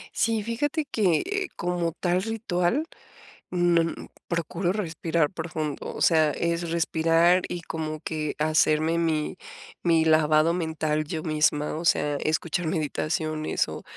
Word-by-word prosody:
Sí, 225 Hz, -2 st, +1 dB
fíjate 290 Hz, +7 st, -1 dB
que, 275 Hz, -, 0 dB
como 175 Hz, -1 st, -1 dB
tal 175 Hz, +2 st, 0 dB
ritual, 220 Hz, -, -1 dB, 0.7 s
mm, 175 Hz, -2 st, +1 dB, 0.2 s
procuro 170 Hz, +2 st, -1 dB
respirar 165 Hz, -5 st, -1 dB
profundo, 160 Hz, -4 st, -4 dB
o -, -, -3 dB
sea, 160 Hz, -3 st, +4 dB
es 170 Hz, +1 st, -1 dB
respirar, 165 Hz, +2 st, +3 dB
y 175 Hz, -1 st, -5 dB
como 155 Hz, -1 st, -4 dB
que 155 Hz, -1 st, -3 dB
hacerme, 155 Hz, +1 st, +2 dB
mi 160 Hz, 0 st, -1 dB, 0.4 s
mi 165 Hz, -2 st, +3 dB
lavado 155 Hz, 0 st, +4 dB
mental 160 Hz, -3 st, -1 dB
yo 155 Hz, +1 st, -4 dB
misma, 150 Hz, -1 st, +1 dB
o 165 Hz, +2 st, -5 dB
sea, 145 Hz, -2 st, +2 dB
escuchar 160 Hz, +4 st, -1 dB
meditaciones, 155 Hz, 0 st, -1 dB
o -, -, -7 dB
165 Hz, 125 wpm, -26 LUFS, 155-175 Hz, 0.7 s, sea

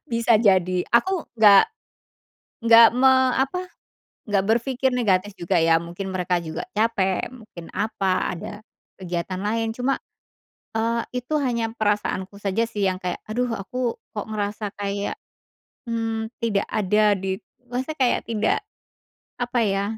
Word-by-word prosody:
Bisa 230 Hz, 0 st, +3 dB
jadi. 185 Hz, -4 st, +3 dB
Aku, 365 Hz, +9 st, +2 dB, 1.4 s
nggak 230 Hz, 0 st, +8 dB
me 265 Hz, +1 st, +6 dB, 0.2 s
apa, 360 Hz, +8 st, -1 dB, 0.6 s
nggak 195 Hz, -2 st, +2 dB
berpikir 255 Hz, +3 st, +1 dB
negatif 205 Hz, -3 st, +1 dB
juga 175 Hz, 0 st, 0 dB
ya, 165 Hz, 0 st, +4 dB
mungkin 175 Hz, +3 st, -6 dB
mereka 180 Hz, -1 st, 0 dB
juga 160 Hz, -2 st, -5 dB
capek, 210 Hz, -4 st, +1 dB
mungkin 215 Hz, -8 st, -12 dB
apa, 195 Hz, -3 st, 0 dB
ada 170 Hz, -, -6 dB, 0.4 s
kegiatan 185 Hz, 0 st, -4 dB
lain. 225 Hz, +2 st, -1 dB
Cuma, 255 Hz, +3 st, 0 dB, 0.8 s
eee, 230 Hz, +1 st, +1 dB, 0.2 s
itu 250 Hz, +5 st, -4 dB
hanya 235 Hz, -3 st, -1 dB
perasaanku 205 Hz, -2 st, -1 dB
saja 205 Hz, +3 st, 0 dB
sih, 205 Hz, -3 st, -1 dB
yang 185 Hz, 0 st, -1 dB
kayak, 180 Hz, 0 st, -3 dB
aduh, 245 Hz, +3 st, -1 dB
aku 240 Hz, +4 st, -3 dB, 0.2 s
kok 210 Hz, -, -4 dB
ngerasa 210 Hz, 0 st, -3 dB
kayak, 200 Hz, 0 st, -3 dB, 0.7 s
mmm, 225 Hz, -1 st, -2 dB, 0.2 s
tidak 205 Hz, -4 st, +1 dB
ada 210 Hz, 0 st, +2 dB
di 190 Hz, 0 st, -3 dB, 0.3 s
maksudnya 260 Hz, +6 st, -4 dB
kayak 255 Hz, -3 st, +2 dB
tidak, 220 Hz, -2 st, +1 dB, 0.8 s
apa 245 Hz, 0 st, -1 dB
ya, 195 Hz, -2 st, +1 dB
215 Hz, 130 wpm, -23 LUFS, 190-235 Hz, 1.4 s, nggak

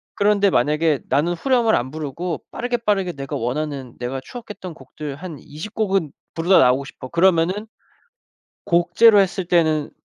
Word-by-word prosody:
그런데 205 Hz, 0 st, +3 dB
만약에 150 Hz, +1 st, +2 dB
'나는 155 Hz, +5 st, +2 dB
후렴을 235 Hz, +3 st, +2 dB
안 125 Hz, +2 st, -2 dB
부르고 155 Hz, +2 st, -5 dB
빠르게, 245 Hz, 0 st, -2 dB
빠르게 200 Hz, -6 st, 0 dB
내가 140 Hz, 0 st, -6 dB
원하는 135 Hz, 0 st, -3 dB
내가 125 Hz, +2 st, -3 dB
추억했던 210 Hz, -, -9 dB
곡들 145 Hz, +1 st, -8 dB
한 165 Hz, 0 st, -8 dB
20 155 Hz, +9 st, -9 dB
곡은 195 Hz, -8 st, 0 dB, 0.2 s
부르다 175 Hz, +3 st, +4 dB
나오고 130 Hz, +2 st, +3 dB
싶어.' 130 Hz, -, -10 dB
그러면은 180 Hz, +4 st, +2 dB, 1.0 s
곡제로 200 Hz, +5 st, +5 dB
했을 190 Hz, -1 st, 0 dB
때는 160 Hz, -4 st, +2 dB
165 Hz, 335 characters per minute, -21 LUFS, 145-195 Hz, 1.0 s, 곡제로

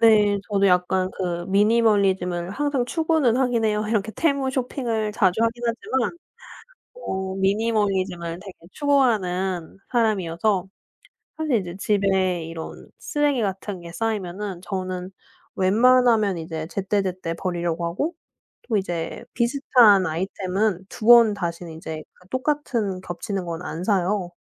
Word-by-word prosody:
네. 210 Hz, -3 st, +5 dB
저도 200 Hz, -2 st, +2 dB
약간 185 Hz, 0 st, +2 dB
그 175 Hz, -2 st, -2 dB
미니멀리즘을 195 Hz, -4 st, +2 dB
항상 280 Hz, +2 st, 0 dB
추구는 315 Hz, -4 st, +1 dB
하긴 245 Hz, -3 st, +1 dB
해요. 210 Hz, -1 st, +1 dB
이렇게 220 Hz, -1 st, 0 dB
Temu 280 Hz, -4 st, +1 dB
쇼핑을 240 Hz, -5 st, -2 dB
자주 190 Hz, 0 st, +2 dB
하긴 230 Hz, +1 st, 0 dB
하지만 245 Hz, +6 st, -1 dB, 0.8 s
어 190 Hz, -, -4 dB
미니멀리즘을 195 Hz, -4 st, 0 dB
되게 195 Hz, 0 st, -10 dB, 0.2 s
추구하는 195 Hz, -, 0 dB
사람이어서 200 Hz, -4 st, +1 dB, 0.7 s
사실 310 Hz, -5 st, +1 dB
이제 180 Hz, -4 st, -3 dB
집에 190 Hz, -4 st, +1 dB
이런 165 Hz, 0 st, -8 dB
쓰레기 295 Hz, -4 st, 0 dB
같은 195 Hz, -1 st, -3 dB
게 170 Hz, 0 st, -10 dB
쌓이면은 195 Hz, -2 st, -3 dB
저는 185 Hz, -1 st, -4 dB, 0.4 s
웬만하면 220 Hz, 0 st, +4 dB
이제 160 Hz, -1 st, -5 dB
제때제때 190 Hz, -3 st, -2 dB
버리려고 170 Hz, -1 st, -2 dB
하고 285 Hz, -, -2 dB, 0.5 s
또 225 Hz, -, +1 dB
이제 175 Hz, -4 st, -3 dB
비슷한 235 Hz, -5 st, +4 dB
아이템은 190 Hz, +3 st, -1 dB
2 220 Hz, -, -6 dB
번 235 Hz, -2 st, +8 dB
다신 175 Hz, -3 st, -4 dB
이제 160 Hz, -1 st, -7 dB, 0.3 s
똑같은 255 Hz, -8 st, -1 dB
겹치는 185 Hz, +2 st, -4 dB
건 170 Hz, 0 st, -4 dB
안 170 Hz, +1 st, -5 dB
사요. 190 Hz, -2 st, 0 dB
200 Hz, 285 characters per minute, -23 LUFS, 180-230 Hz, 0.8 s, 번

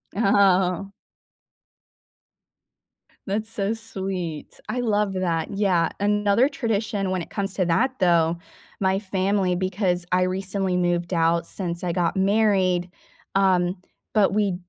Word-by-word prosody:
Oh. 195 Hz, -2 st, +3 dB, 2.4 s
That's 215 Hz, +3 st, -2 dB
so 205 Hz, -1 st, -1 dB
sweet. 190 Hz, -8 st, -6 dB
I 250 Hz, -, -2 dB
love 210 Hz, -4 st, +1 dB
that, 170 Hz, -3 st, -1 dB
yeah, 190 Hz, -5 st, +1 dB
another 205 Hz, +5 st, +2 dB
tradition, 220 Hz, -6 st, -2 dB
when 185 Hz, -2 st, -1 dB
it -, -, -8 dB
comes 195 Hz, -1 st, -3 dB
to 185 Hz, -, +1 dB
that 230 Hz, +11 st, +2 dB
though, 170 Hz, -2 st, +3 dB, 0.4 s
my 190 Hz, -1 st, +2 dB
family 195 Hz, -1 st, 0 dB
because 185 Hz, -1 st, -1 dB
I 180 Hz, 0 st, +3 dB
recently 190 Hz, 0 st, -1 dB
moved 175 Hz, 0 st, 0 dB
out 170 Hz, 0 st, +2 dB
since 175 Hz, -1 st, -5 dB
I 180 Hz, -, 0 dB
got 175 Hz, 0 st, 0 dB
married, 190 Hz, -3 st, +2 dB, 0.5 s
um, 185 Hz, -2 st, +2 dB, 0.4 s
but 205 Hz, -3 st, +3 dB
we 205 Hz, -3 st, +1 dB
190 Hz, 125 wpm, -24 LUFS, 180-205 Hz, 2.4 s, Oh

